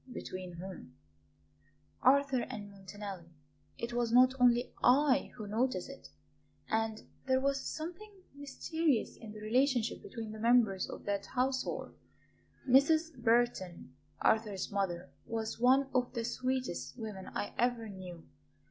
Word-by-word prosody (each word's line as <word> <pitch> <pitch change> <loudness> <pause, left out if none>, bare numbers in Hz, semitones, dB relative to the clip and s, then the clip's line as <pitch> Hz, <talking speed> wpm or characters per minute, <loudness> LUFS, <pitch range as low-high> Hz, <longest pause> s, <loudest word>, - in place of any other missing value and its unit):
"Between 185 -6 -6
whom?" 175 -7 -9 1.1
"Arthur 275 0 +4
and 210 -5 -6
Montanelli. 195 -3 -9 0.4
It 235 +1 -4
was 240 -1 0
not 255 +2 +6
only 245 0 +4
I 275 +2 +4
who 215 -4 -7
noticed 220 -2 0
it. 275 - -12 0.6
And 220 0 -1 0.2
there 260 0 +4
was 275 0 0
something 355 +7 -6 0.2
mysterious 285 -1 -1
in 220 -2 -10
the 215 0 -10
relationship 245 +1 +1
between 225 -2 -7
the 215 - -8
members 225 -5 +3
of - - -8
that 200 -1 -2
household. 260 +1 -1 0.7
Mrs. 310 +5 +4
Burton, 230 - 0 0.3
Arthur's 215 -4 +1
mother, 185 -3 -2 0.2
was 225 -1 -3
one 260 +3 +5
of 250 -1 +1
the 230 -1 -1
sweetest 255 +1 -2
women 210 -5 -6
I 205 - -3
ever 240 -2 +1
knew. 185 -4 -9
235 Hz, 130 wpm, -33 LUFS, 205-260 Hz, 1.1 s, not